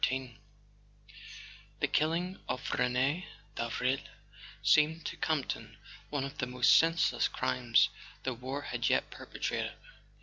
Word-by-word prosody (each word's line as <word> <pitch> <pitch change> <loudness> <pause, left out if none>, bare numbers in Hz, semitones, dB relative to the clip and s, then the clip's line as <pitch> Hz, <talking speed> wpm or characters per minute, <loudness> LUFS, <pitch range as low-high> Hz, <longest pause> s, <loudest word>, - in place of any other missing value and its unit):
XIII 130 -3 0 1.4
HE - - +2
killing 170 +5 0
of 125 0 -2
Rene 130 +7 +1 0.3
Davril 125 +3 0 0.6
seemed 155 +1 +4
to - - -3
Campton 155 -4 -2 0.3
one 145 -2 -1
of 140 0 -7
the 125 - 0
most 125 -1 +5
senseless 165 +1 +3
crimes 65 0 +2 0.3
the 130 - -1
war 130 +4 -5
had - - -1
yet - - +1
perpetrated. - - -3
135 Hz, 115 wpm, -32 LUFS, 125-155 Hz, 1.4 s, most